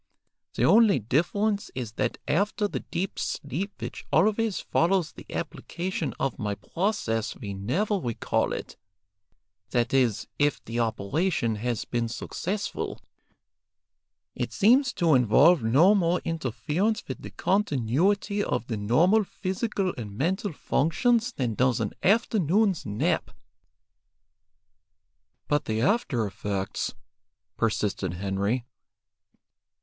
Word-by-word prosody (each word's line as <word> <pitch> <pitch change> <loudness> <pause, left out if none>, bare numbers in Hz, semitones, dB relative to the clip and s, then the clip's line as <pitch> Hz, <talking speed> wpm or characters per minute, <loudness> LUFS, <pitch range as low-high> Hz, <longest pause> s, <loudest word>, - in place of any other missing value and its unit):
The - - +2
only 220 -3 +6
difference 200 - 0
is 120 -4 -4
that - - -2
after 205 +5 +1
the - - -4
deep 180 +2 -4
sleep 170 +9 -4
which - - -6
always 215 -1 +2
follows 175 -1 +1
the - - -13
application 175 -3 -4
of 135 -1 -1
my 105 -3 -2
process 115 - -2
we 100 -6 -6
never 175 - 0
recall 120 -9 -1
it, - - -6 0.9
that 120 +1 0
is, 125 -6 +2
if 145 -1 +2
the 115 +1 -3
operation 115 - 0
has 120 0 -2
been 120 -1 -1
successful. 190 - -4 1.3
It - - -3
seems 240 +5 +4
to 165 -3 +3
involve 135 +6 +5
no 140 - +5
more 180 -3 +2
interference 165 - -1
with - - -6
the - - -7
continuity 195 - +1
of 125 - -1
the 115 -3 -3
normal 165 - +3
physical 190 0 -2
and 105 -3 -7
mental 190 - 0
functions 230 - +1
than 125 - -2
does 125 +2 +2
an 105 -3 -1
afternoon's 200 - +2
nap." 105 +1 0 2.2
"But 145 -1 +1
the 110 0 -1
after 135 - +1
effects!" 100 0 -3 0.6
persisted 105 -5 -1
Henry. 100 +6 -1
150 Hz, 115 wpm, -27 LUFS, -, 2.2 s, only